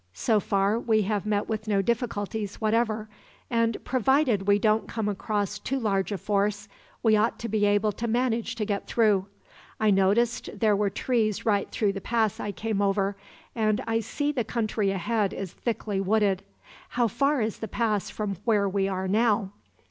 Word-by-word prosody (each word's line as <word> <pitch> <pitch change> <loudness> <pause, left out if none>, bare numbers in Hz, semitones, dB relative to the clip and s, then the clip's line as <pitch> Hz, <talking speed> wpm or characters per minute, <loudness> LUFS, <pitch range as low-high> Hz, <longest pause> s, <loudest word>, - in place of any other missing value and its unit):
"So 215 - +2
far 200 +2 +1
we 220 -3 +2
have 205 0 -1
met 205 -1 0
with 215 -1 -3
no 200 -2 +2
difficulties, 215 -3 -2
whatever, 220 -1 0 0.4
and 230 -1 +1
provided 255 -5 +2
we 200 0 +5
don't 215 0 +2
come 220 -2 -3
across 205 0 -2
too 270 - -2
large 200 -5 0
a 200 - -1
force, 205 +1 -1 0.4
we 220 -2 +5
ought 215 +2 +2
to 235 - -5
be 210 -1 +1
able 205 +1 +2
to 235 +3 -4
manage 235 0 0
to 220 -2 -2
get 200 -1 -3
through. 210 -4 +2 0.5
I 215 -1 +3
noticed 210 +5 +1
there 215 -3 +3
were 205 0 +1
trees 220 -1 0
right 205 -3 +1
through 210 -5 0
the 195 - -5
pass 220 -1 0
I 205 - -3
came 215 0 -2
over; 200 0 +1 0.4
and 215 -1 +1
I 225 0 +1
see 290 +6 -2
the 255 -5 -1
country 215 -2 -1
ahead 200 +2 0
is 190 -3 -5
thickly 215 -4 -2
wooded. 200 -1 +2 0.5
How 240 -1 +1
far 275 +6 +1
is 220 -1 -2
the 220 - -4
pass 215 -1 -1
from 205 -3 -3
where 210 -4 +2
we 195 0 0
are 190 -1 -2
now?" 210 -1 +2
215 Hz, 180 wpm, -26 LUFS, 200-230 Hz, 0.5 s, we